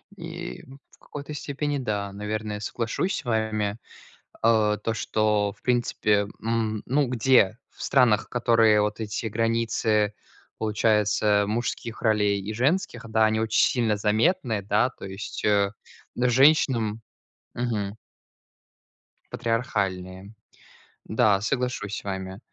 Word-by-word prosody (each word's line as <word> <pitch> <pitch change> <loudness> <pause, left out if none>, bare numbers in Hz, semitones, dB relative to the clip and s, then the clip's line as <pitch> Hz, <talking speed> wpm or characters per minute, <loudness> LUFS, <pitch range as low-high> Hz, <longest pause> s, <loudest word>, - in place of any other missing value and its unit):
И 175 -1 -7 0.3
в - - -23
какой-то 145 +1 -8
степени, 145 0 -3
да, 105 -6 -2
наверное, 105 +1 -4
соглашусь 115 - -2
с - - -7
вами. 110 -3 -1 0.7
Э, 110 -2 +3
то, 115 - 0
что 105 -2 0
в 105 - -29
принципе, 110 -4 +1
м, 110 -2 -1
ну, 140 +2 +1
где, 120 -3 +3
в - - -15
странах, 125 -6 +3
которые 115 -3 +4
вот 105 +2 -1
эти 105 +1 -4
границы, 110 -1 +1 0.4
получается, 105 -1 +2
мужских 115 +1 -3
ролей 105 -3 +2
и 105 +3 -5
женских, 125 - 0
да, 110 0 +3
они 110 0 +1
очень 110 0 +2
сильно 115 -4 +1
заметны, 110 - +1
да, 105 +5 +2
то - - -11
есть, 95 +2 -7
э, 100 -1 +3 0.4
женщинам 125 -3 +3 0.5
мгм. 110 -4 -2 1.4
Патриархальные. 100 -5 -2 0.7
Да, 100 -2 +2
соглашусь 120 -3 -2
с - - -7
вами. 95 -1 -5
110 Hz, 115 wpm, -25 LUFS, 105-120 Hz, 1.4 s, которые